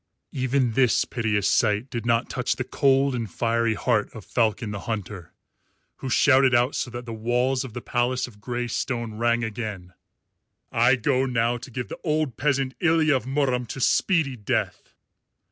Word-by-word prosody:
Even 130 -1 0
this 125 +1 +3
piteous 110 -4 0
sight 110 +2 +1
did 120 -1 -4
not 115 0 +2
touch 125 -1 -1
the 125 - -3
cold 135 +1 +2
and 115 -4 -3
fiery 115 +2 0
heart 110 -1 0
of 110 - -9
Falcon 115 -1 0
the 100 - -4
Hunter, 105 -5 -5 0.7
who 135 - -5
shouted 130 0 +4
out 120 +3 +2
so - - -2
that 120 0 -7
the 115 - -6
walls 125 +4 0
of 130 -5 -9
the 120 - -6
palace 125 +1 0
of 105 -4 -15
grey 120 +1 -3
stone 115 -2 -3
rang 120 0 +2
again, 105 -5 -5 0.8
"I 120 +3 +4
go 130 +2 +1
now 120 -1 +1
to 130 - -10
give 125 -2 -5
the - - -8
old 155 -5 0
peasant, 135 -2 0
Ilya 160 -2 +3
of 130 - -2
Murom, 130 -3 0
to 135 - -6
speedy 150 0 +2
death." 105 -4 -3
120 Hz, 175 wpm, -24 LUFS, 115-130 Hz, 0.8 s, shouted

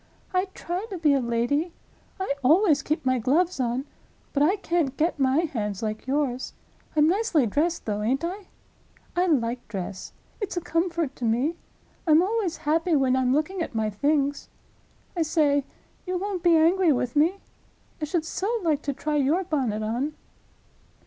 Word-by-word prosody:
I 365 +1 +2
try 360 +5 -4
to 385 - -5
be 305 -4 +3
a 275 - +3
lady; 245 +8 0 0.5
I 380 -7 0
always 310 +1 +5
keep 305 -2 -2
my 255 -1 +2
gloves 320 +8 +1
on—but 260 +3 -4
I 335 +7 +4
can't 335 -8 -1
get 320 0 0
my 270 +3 +3
hands 215 - -3
like 215 +2 -4
yours. 265 -2 -1 0.4
I'm 300 0 +5
nicely 360 - +2
dressed, 320 - 0
though, 210 -1 -2
ain't 255 +8 0
I? 370 +3 -4 0.7
I 360 +1 +2
like 245 -6 0
dress; 190 -2 -6 0.3
it's 410 -4 -4
a - - +3
comfort 335 -4 -1
to 245 - -3
me. 250 +9 +1 0.5
I'm 315 +2 +6
always 390 -4 -1
happy 325 +2 +2
when 265 -2 +3
I'm 255 -1 +2
looking 310 +7 0
at 320 - -4
my 215 -1 0
things. 285 +5 0 0.7
I 345 - 0
say—you 310 +3 -1
won't 385 -1 -3
be 335 -1 +5
angry 340 +2 +4
with 250 -1 -1
me?—I 320 -1 -3
should 320 +1 -1
so 390 +6 -2
like 305 -4 +1
to 280 - -2
try 300 +2 -2
your 295 +7 +2
bonnet 255 - -1
on." 250 +8 -2
300 Hz, 160 wpm, -26 LUFS, 255-345 Hz, 0.7 s, I'm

